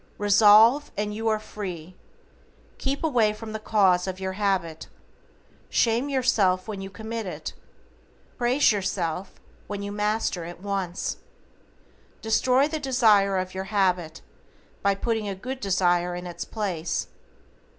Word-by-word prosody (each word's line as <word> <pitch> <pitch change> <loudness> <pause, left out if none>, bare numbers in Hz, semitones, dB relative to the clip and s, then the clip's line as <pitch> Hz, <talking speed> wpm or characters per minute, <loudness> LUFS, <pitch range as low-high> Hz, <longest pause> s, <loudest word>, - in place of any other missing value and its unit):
RESOLVE, 215 +7 +6
AND 210 0 -2
YOU 225 +2 -3
ARE 220 -1 +2
FREE. 185 -5 -7 0.8
Keep 275 +3 -2
away 235 -9 +2
from 220 0 -8
the 220 - -4
cause 195 -4 +2
of 185 0 -4
your 190 0 -3
habit. 185 -5 -1 0.8
Shame 235 +4 +1
yourself 225 -9 +2
when 205 -3 -5
you 195 - -6
commit 220 +2 -6
it. 155 -3 -6 0.8
Praise 250 +3 +3
yourself 185 -3 -3 0.3
when 200 -1 -5
you 200 - -4
master 210 -3 -1
it 170 +1 -8
once. 195 -2 -3 1.0
Destroy 255 +5 +2
the 310 0 -3
desire 220 -8 +3
of 185 0 -3
your 190 0 -4
habit, 185 -5 0 0.6
by 200 0 +2
putting 220 +1 -2
a 195 - -3
good 255 +7 -6
desire 180 -4 +1
in 180 0 -6
its 175 -1 -6
place. 185 -7 -3
205 Hz, 135 wpm, -25 LUFS, 185-225 Hz, 1.0 s, RESOLVE